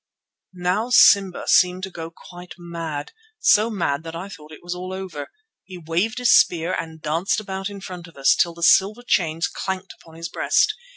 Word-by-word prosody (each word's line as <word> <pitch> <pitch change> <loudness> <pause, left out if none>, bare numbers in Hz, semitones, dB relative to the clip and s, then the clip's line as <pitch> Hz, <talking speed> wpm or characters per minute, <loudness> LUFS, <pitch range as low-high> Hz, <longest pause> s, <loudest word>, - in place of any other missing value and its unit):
Now 185 +6 -1
Simba 200 -6 +5
seemed 180 +1 +3
to 190 - -5
go 165 -1 -7
quite 175 +1 -13
mad, 165 -4 -6 0.3
so 215 - +4
mad 170 -9 -1
that 165 0 -8
I 180 +4 -6
thought 155 -5 -12
all 155 - -10
was 175 0 -4
over. 185 -4 -6 0.4
He 185 -1 -11
waved 175 +7 -2
his 250 -2 +3
spear 170 +1 +3
and 160 -2 -5
danced 160 +7 -1
about 195 -1 -5
in 200 -1 -9
front 180 -2 -8
of 165 - -18
us, 135 0 +4
till 170 -1 +1
the 170 - -7
silver 205 +7 +4
chains 165 -6 +1
clanked 190 -1 -5
upon 160 -1 -18
his 165 +1 -6
breast. - - +1
180 Hz, 185 wpm, -22 LUFS, 165-190 Hz, 0.4 s, Simba